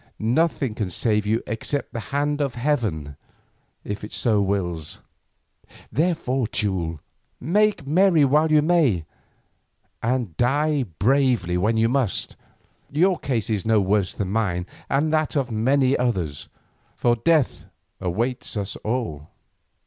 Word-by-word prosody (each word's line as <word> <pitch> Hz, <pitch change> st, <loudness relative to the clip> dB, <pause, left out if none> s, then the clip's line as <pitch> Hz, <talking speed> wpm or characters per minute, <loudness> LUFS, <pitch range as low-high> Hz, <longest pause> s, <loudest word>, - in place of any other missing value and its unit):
Nothing 135 Hz, +1 st, +1 dB
can 105 Hz, -3 st, -3 dB
save 105 Hz, +2 st, +1 dB
you 110 Hz, +2 st, +1 dB
except 125 Hz, +6 st, -3 dB
the 120 Hz, -, -3 dB
hand 145 Hz, +1 st, 0 dB
of 140 Hz, -4 st, -1 dB
heaven 110 Hz, -, -1 dB, 0.7 s
if 105 Hz, 0 st, -5 dB
it 105 Hz, -, -5 dB
wills. 95 Hz, -7 st, 0 dB, 0.9 s
Therefore, 145 Hz, -7 st, 0 dB
Teule, 90 Hz, -8 st, -1 dB, 0.4 s
make 205 Hz, +3 st, +1 dB
merry 165 Hz, 0 st, +4 dB
while 150 Hz, +4 st, +3 dB
you 150 Hz, -1 st, +5 dB
may, 150 Hz, -, +2 dB, 1.0 s
and 120 Hz, -8 st, -1 dB
die 145 Hz, +2 st, +1 dB
bravely 120 Hz, -5 st, +2 dB
when 105 Hz, +6 st, +1 dB
you 110 Hz, +1 st, +3 dB
must. 125 Hz, -4 st, 0 dB, 0.5 s
Your 180 Hz, +5 st, +2 dB
case 120 Hz, -5 st, -1 dB
is 105 Hz, -3 st, 0 dB
no 110 Hz, -1 st, +3 dB
worse 100 Hz, -1 st, +1 dB
than 95 Hz, -2 st, -3 dB
mine 95 Hz, -5 st, 0 dB, 0.2 s
and 155 Hz, +3 st, +1 dB
that 155 Hz, 0 st, +1 dB
of 135 Hz, -4 st, 0 dB
many 130 Hz, +4 st, +2 dB
others, 90 Hz, -, -2 dB, 0.5 s
for 120 Hz, -1 st, +2 dB
death 150 Hz, +3 st, +1 dB, 0.3 s
awaits 115 Hz, +7 st, -2 dB
us 100 Hz, -2 st, -3 dB
all. 105 Hz, -, -3 dB
120 Hz, 125 wpm, -23 LUFS, 100-145 Hz, 1.0 s, you